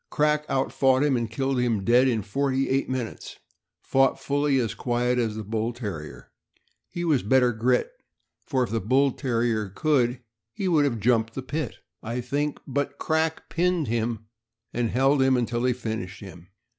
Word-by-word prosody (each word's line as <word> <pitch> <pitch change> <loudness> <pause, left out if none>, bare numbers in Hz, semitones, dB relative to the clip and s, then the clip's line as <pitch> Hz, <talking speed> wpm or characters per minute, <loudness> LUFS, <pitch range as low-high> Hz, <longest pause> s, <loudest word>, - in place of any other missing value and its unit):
Crack 150 0 +1
outfought 135 +1 +2
him, 145 -3 +2
and 115 -2 -1
killed 135 +3 -1
him 115 -5 0
dead 120 +5 +4
in 115 -5 0
forty 135 +6 0
eight 135 +1 0
minutes, 130 -3 -4
and - - -28 0.5
fought 135 0 +3
fully 145 0 +1
as 115 -6 0
quiet 125 0 0
as 110 -3 -1
the 110 - -5
Bull 110 +3 -2
Terrier. 80 - -7 0.6
He 175 0 -4
was 150 -6 +3
better 125 +3 +3
grit, 125 - +1 0.5
for 130 -3 0
if 120 - -4
the 115 - 0
Bull 130 +7 +3
Terrier 115 -5 -1
could, 125 +2 +1 0.3
he 195 - -3
would 155 -5 +3
have 120 -5 -1
jumped 115 0 +1
the 130 - -4
pit, 150 +4 -3 0.3
I 115 +3 -4
think; 140 +4 -2
but 140 +1 -2
Crack 160 0 -1
pinned 175 -5 0
him 115 -1 -2 0.5
and 120 -1 0
held 135 +3 +3
him 130 -1 +4
until 120 0 -1
he 125 - +3
finished 110 -5 -5
him. 90 -3 -11
125 Hz, 175 wpm, -25 LUFS, 115-140 Hz, 0.6 s, dead